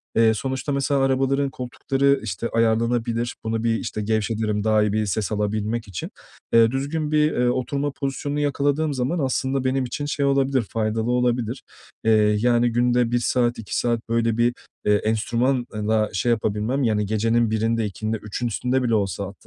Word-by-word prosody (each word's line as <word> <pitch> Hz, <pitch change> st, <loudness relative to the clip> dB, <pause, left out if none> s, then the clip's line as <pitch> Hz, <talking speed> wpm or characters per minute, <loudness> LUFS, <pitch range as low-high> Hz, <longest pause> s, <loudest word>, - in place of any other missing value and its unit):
Eee, 115 Hz, 0 st, +5 dB
sonuçta, 130 Hz, +5 st, -3 dB
mesela, 140 Hz, 0 st, +1 dB
arabaların 135 Hz, +1 st, +1 dB
koltukları, 135 Hz, +2 st, 0 dB
işte, 110 Hz, +2 st, -3 dB
ayarlanabilir. 115 Hz, +1 st, 0 dB
Bunu 110 Hz, 0 st, -2 dB
bir, 115 Hz, -1 st, +2 dB
işte, 110 Hz, -, -4 dB
gevşetirim 110 Hz, 0 st, -1 dB
daha 110 Hz, 0 st, +3 dB
iyi 105 Hz, -1 st, 0 dB
bir 110 Hz, 0 st, +1 dB
ses 105 Hz, +2 st, -2 dB
alabilmek 105 Hz, +2 st, -1 dB
için. 95 Hz, -4 st, -6 dB, 0.4 s
Eee, 115 Hz, 0 st, +6 dB
düzgün 145 Hz, +3 st, -2 dB
bir, 150 Hz, 0 st, +3 dB
eee, 125 Hz, -4 st, +1 dB
oturma 140 Hz, +3 st, -1 dB
pozisyonunu 140 Hz, +1 st, -3 dB
yakaladığım 145 Hz, +1 st, 0 dB
zaman 135 Hz, +6 st, -1 dB
aslında 135 Hz, -1 st, 0 dB
benim 130 Hz, 0 st, +1 dB
için, 145 Hz, +4 st, -4 dB
şey, 145 Hz, -1 st, -1 dB
olabilir, 135 Hz, -1 st, +2 dB
faydalı 110 Hz, +1 st, -1 dB
olabilir. 125 Hz, 0 st, 0 dB, 0.4 s
Eee, 105 Hz, -1 st, +4 dB
yani, 120 Hz, +1 st, +3 dB
günde 120 Hz, 0 st, +2 dB
1 120 Hz, -, +2 dB
saat, 120 Hz, 0 st, +1 dB
2 110 Hz, -, -4 dB
saat 120 Hz, -1 st, +1 dB
böyle 115 Hz, -1 st, +1 dB
bir, 120 Hz, +1 st, +3 dB, 0.3 s
eee, 105 Hz, -, +4 dB
enstrümanla 110 Hz, 0 st, 0 dB
şey 100 Hz, +5 st, 0 dB
yapabilmem, 110 Hz, +4 st, 0 dB
yani, 105 Hz, -3 st, +1 dB
gecenin 115 Hz, +2 st, +1 dB
1’inde 115 Hz, +1 st, 0 dB
2’sinde 110 Hz, +2 st, -3 dB
3’ün 105 Hz, +3 st, -4 dB
üstünde 125 Hz, +4 st, 0 dB
bile 115 Hz, -2 st, +2 dB
olsa 100 Hz, -1 st, -2 dB
120 Hz, 165 wpm, -23 LUFS, 110-130 Hz, 0.4 s, Eee